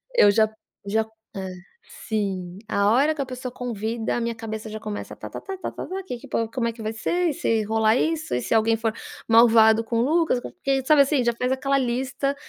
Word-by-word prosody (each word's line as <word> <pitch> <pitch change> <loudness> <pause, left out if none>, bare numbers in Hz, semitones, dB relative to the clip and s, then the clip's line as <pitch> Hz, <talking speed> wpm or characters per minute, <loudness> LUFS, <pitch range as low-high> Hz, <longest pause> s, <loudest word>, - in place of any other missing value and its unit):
Eu 205 - +7
já 215 +1 +4 0.4
já 220 +2 +1 0.3
Hã. 190 -1 -4 0.6
Sim. 190 -4 -2
A 200 -1 +2
hora 285 +6 +4
que 285 - -3
a - - -1
pessoa 255 0 -6
convida, 230 -2 -3
a 240 - -1
minha 235 0 -1
cabeça 220 -1 -6
já 215 0 -6
começa: 210 -1 -6
“Ta-ta-ta, 385 -1 -7
ta-ta-ta. 380 +1 -5
Que 250 -10 -5
que - - -12
po 230 -1 -1
como 245 -3 -1
é 230 - -2
que 225 - -11
vai 215 - -2
ser? 345 +10 0
E - - -1
se 225 -10 0
rolar 220 +1 +2
isso? 315 - -1
E 125 - 0
se - - -2
alguém 225 0 +3
for 225 0 0 0.4
malvado 225 -1 +6
com 230 +1 -2
o - - +3
Lucas, 315 -1 +2
co”. - - -8 0.2
E, 270 -1 +2
sabe, 300 -1 +6
assim? 275 -2 +1
Já 235 0 +2
fez 250 +2 -1
aquela 275 +1 +1
lista 265 +3 -1
230 Hz, 220 wpm, -24 LUFS, 220-270 Hz, 0.6 s, Eu